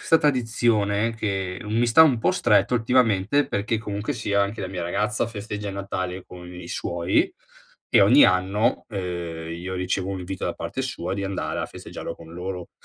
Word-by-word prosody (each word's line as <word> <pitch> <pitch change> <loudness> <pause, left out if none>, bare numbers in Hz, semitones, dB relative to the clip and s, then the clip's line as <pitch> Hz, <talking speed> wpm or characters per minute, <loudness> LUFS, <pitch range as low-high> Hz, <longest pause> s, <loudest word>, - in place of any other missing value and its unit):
'sta 165 - +5
tradizione 115 -5 +1
che 95 -4 -2
mi 115 +3 +1
sta 120 +7 +7
un 140 -7 +4
po' - - +2
stretto 105 -1 +3
ultimamente, 120 +1 +3
perché 105 +3 -1
comunque 105 +5 -3
sia 100 -3 0
anche 100 +2 -3
la 95 - -3
mia 95 -1 -5
ragazza 105 +6 0
festeggia 105 -2 -5
il 100 - -5
Natale 95 -2 -4
con 90 -1 -11
i 90 0 -9
suoi, 85 +1 0 0.6
e - - +6
ogni - - +7
anno, 95 +4 +2
ehm, 85 -5 -4
io 90 +2 -5
ricevo 90 +1 -1
un 95 -1 -4
invito 95 +1 -4
da - - -2
parte - - -5
sua 95 -9 -3
di 100 0 -2
andare 95 0 -3
a - - -2
festeggiarlo 85 - -7
con 80 0 -13
loro. 90 0 -6
100 Hz, 180 wpm, -24 LUFS, 90-110 Hz, 0.6 s, sta